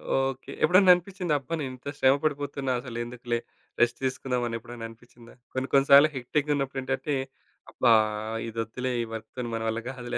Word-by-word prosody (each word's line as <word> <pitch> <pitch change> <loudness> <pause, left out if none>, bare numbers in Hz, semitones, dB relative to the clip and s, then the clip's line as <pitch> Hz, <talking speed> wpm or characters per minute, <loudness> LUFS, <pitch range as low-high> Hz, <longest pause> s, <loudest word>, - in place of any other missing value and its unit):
Okay. 135 0 -1
ఎప్పుడన్నా 185 +1 +7
అనిపిచ్చిందా, 180 -2 -3
"అబ్బా! 140 +4 -8
నేను 130 -2 -3
ఇంత 135 +3 -7
శ్రమ 130 +1 +5
పడిపోతున్నా, 145 -3 -1
అసలు 120 -2 -7
ఎందుకులే 120 -1 -3 0.4
రెస్ట్ 120 0 +3
తీసుకుందాం" 130 -1 -1
అనెప్పుడైనా 115 0 -6
అనిపిచ్చిందా? 120 +1 -17 0.2
కొన్ని 130 +1 -2
కొన్ని 140 0 +5
సార్లు 145 +2 +9
హెక్టిక్‌గా 145 +4 0
ఉన్నప్పుడు 135 -1 -2
ఏంటంటే, 135 +2 -1 0.6
"అబ్బా! 120 -3 +4 0.6
ఇదొద్దులే, 115 +3 -3
ఈ - - -4
వర్క్‌తోని 115 +2 -6
మన 115 - -3
వల్ల 110 +1 -2
కాదులే" 125 -2 -4
130 Hz, 160 wpm, -27 LUFS, 120-140 Hz, 0.6 s, సార్లు